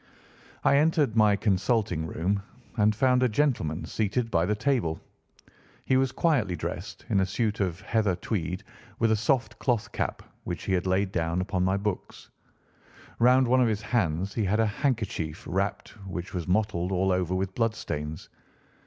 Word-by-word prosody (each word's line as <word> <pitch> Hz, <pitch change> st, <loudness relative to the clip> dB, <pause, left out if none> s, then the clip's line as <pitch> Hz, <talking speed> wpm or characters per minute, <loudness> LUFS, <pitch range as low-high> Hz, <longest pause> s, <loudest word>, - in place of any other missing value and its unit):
I 140 Hz, -, +5 dB
entered 150 Hz, -5 st, +2 dB
my 105 Hz, -2 st, +5 dB
consulting 100 Hz, -4 st, 0 dB
room 95 Hz, +6 st, -1 dB, 0.3 s
and 105 Hz, -1 st, +3 dB
found 125 Hz, +2 st, +3 dB
a 125 Hz, -, +3 dB
gentleman 105 Hz, -, 0 dB
seated 115 Hz, +2 st, -1 dB
by 85 Hz, +1 st, +2 dB
the 105 Hz, -, +1 dB
table. 110 Hz, -, 0 dB, 0.9 s
He 130 Hz, -, +2 dB
was 130 Hz, -1 st, +2 dB
quietly 130 Hz, -, +1 dB
dressed 75 Hz, -, -6 dB
in 100 Hz, -, +3 dB
a 95 Hz, -, +3 dB
suit 110 Hz, +2 st, -1 dB
of 95 Hz, -2 st, -1 dB
heather 110 Hz, -5 st, +1 dB
tweed 90 Hz, 0 st, -3 dB, 0.3 s
with 115 Hz, -1 st, +2 dB
a -, -, +4 dB
soft 115 Hz, 0 st, 0 dB
cloth 120 Hz, -5 st, 0 dB
cap -, -, -3 dB, 0.2 s
which 90 Hz, -, -5 dB
he 95 Hz, -, -1 dB
had 90 Hz, 0 st, 0 dB
laid 95 Hz, +1 st, +1 dB
down 85 Hz, -1 st, -1 dB
upon 95 Hz, 0 st, -1 dB
my 95 Hz, +1 st, +2 dB
books. 100 Hz, -1 st, -5 dB, 0.9 s
Round 125 Hz, +2 st, +5 dB
one 130 Hz, +2 st, +4 dB
of 125 Hz, -, +4 dB
his 110 Hz, -1 st, -1 dB
hands 95 Hz, -4 st, 0 dB
he 110 Hz, -, 0 dB
had 105 Hz, +4 st, +1 dB
a 110 Hz, -, +4 dB
handkerchief 105 Hz, -, -2 dB
wrapped, 100 Hz, +2 st, -2 dB, 0.2 s
which 90 Hz, +1 st, -5 dB
was 90 Hz, -3 st, -3 dB
mottled 90 Hz, -2 st, 0 dB
all 95 Hz, +1 st, +1 dB
over 90 Hz, 0 st, 0 dB
with 95 Hz, 0 st, -2 dB
bloodstains. 80 Hz, -10 st, -3 dB
100 Hz, 170 wpm, -27 LUFS, 90-115 Hz, 0.9 s, I